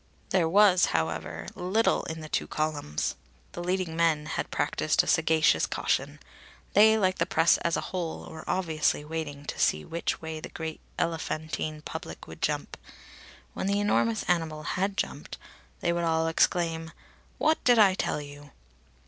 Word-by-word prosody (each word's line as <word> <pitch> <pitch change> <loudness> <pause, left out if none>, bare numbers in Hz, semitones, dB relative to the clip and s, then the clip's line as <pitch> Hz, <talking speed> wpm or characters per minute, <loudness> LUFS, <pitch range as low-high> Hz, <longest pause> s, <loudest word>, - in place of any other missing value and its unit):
There 175 -4 +3
was, 195 -1 +6
however, 80 - -3
little 195 +6 +1
in 160 0 -5
the 155 - -7
two - - -1
columns. 150 - -2 0.4
The 175 - -6
leading 180 -2 -1
men 160 -2 +2
had 150 - -3
practised 155 +1 +1
a - - -8
sagacious 160 - +3
caution. - - -1 0.5
They, 220 +2 +7
like 185 -3 +1
the 170 - +1
press 165 -3 +4
as 170 - 0
a - - -1
whole, 175 -3 -3
were 160 0 -9
obviously 160 -5 0
waiting 150 -2 -5
to - - -5
see 75 0 +2
which 170 +1 -2
way 160 -1 -5
the - - -8
great 160 -1 -6 0.2
elephantine 155 -2 -3
public - - -7
would - - -12
jump. - - -2 0.8
When - - -3
the 200 +1 +1
enormous 115 - +1
animal 160 -3 -1
had 195 +5 -1
jumped, - - -4 0.4
they 170 - +1
would 170 0 -1
all 160 -1 +1
exclaim: 165 0 +1 0.5
"What 315 +1 +2
did 245 -1 +5
I 200 -3 +6
tell 185 - -1
you?" 145 0 -11
165 Hz, 160 wpm, -28 LUFS, 155-185 Hz, 0.8 s, They